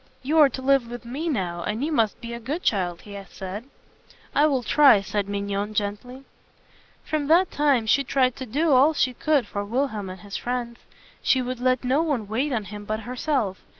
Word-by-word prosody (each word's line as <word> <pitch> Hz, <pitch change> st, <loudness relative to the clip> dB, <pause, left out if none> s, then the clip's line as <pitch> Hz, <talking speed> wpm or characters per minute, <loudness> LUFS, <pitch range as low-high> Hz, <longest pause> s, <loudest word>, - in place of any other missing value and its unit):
"You 305 Hz, +5 st, +2 dB
are 295 Hz, -2 st, +7 dB
to 260 Hz, 0 st, -7 dB
live 270 Hz, -3 st, +3 dB
with 240 Hz, 0 st, -8 dB
me 285 Hz, +8 st, -3 dB
now, 180 Hz, -, -2 dB
and 215 Hz, +9 st, -2 dB
you 320 Hz, -, -2 dB
must 225 Hz, -8 st, +1 dB
be 235 Hz, -1 st, -6 dB
a 235 Hz, -, -5 dB
good 285 Hz, +10 st, -4 dB
child," 180 Hz, -5 st, 0 dB
he 205 Hz, -1 st, -11 dB
said. 195 Hz, +5 st, -7 dB, 0.7 s
"I 295 Hz, +2 st, +4 dB
will 265 Hz, -4 st, 0 dB
try," 275 Hz, -1 st, +6 dB
said 200 Hz, 0 st, -3 dB
Mignon 200 Hz, +1 st, -3 dB
gently. 210 Hz, +6 st, -3 dB, 0.8 s
From 300 Hz, -2 st, -2 dB
that 345 Hz, +4 st, +4 dB
time 280 Hz, -6 st, +2 dB
she 275 Hz, +6 st, +3 dB
tried 255 Hz, -2 st, +1 dB
to 260 Hz, -, -6 dB
do 300 Hz, +8 st, +1 dB
all 275 Hz, +4 st, +5 dB
that -, -, -10 dB
she 255 Hz, -, +2 dB
could 290 Hz, -1 st, +1 dB
for 205 Hz, 0 st, -4 dB
Wilhelm 220 Hz, -3 st, -2 dB
and 185 Hz, -1 st, -9 dB
his 200 Hz, +1 st, -6 dB
friends. 240 Hz, -1 st, -4 dB, 0.4 s
She 260 Hz, -1 st, +2 dB
would 250 Hz, 0 st, -4 dB
let 255 Hz, 0 st, +1 dB
no 260 Hz, +5 st, +2 dB
one 280 Hz, -10 st, -1 dB
wait 255 Hz, +8 st, -1 dB
on 230 Hz, -4 st, -1 dB
him 205 Hz, +1 st, -8 dB
but 215 Hz, +1 st, -3 dB
herself. 245 Hz, -5 st, -2 dB
245 Hz, 210 wpm, -24 LUFS, 210-275 Hz, 0.8 s, are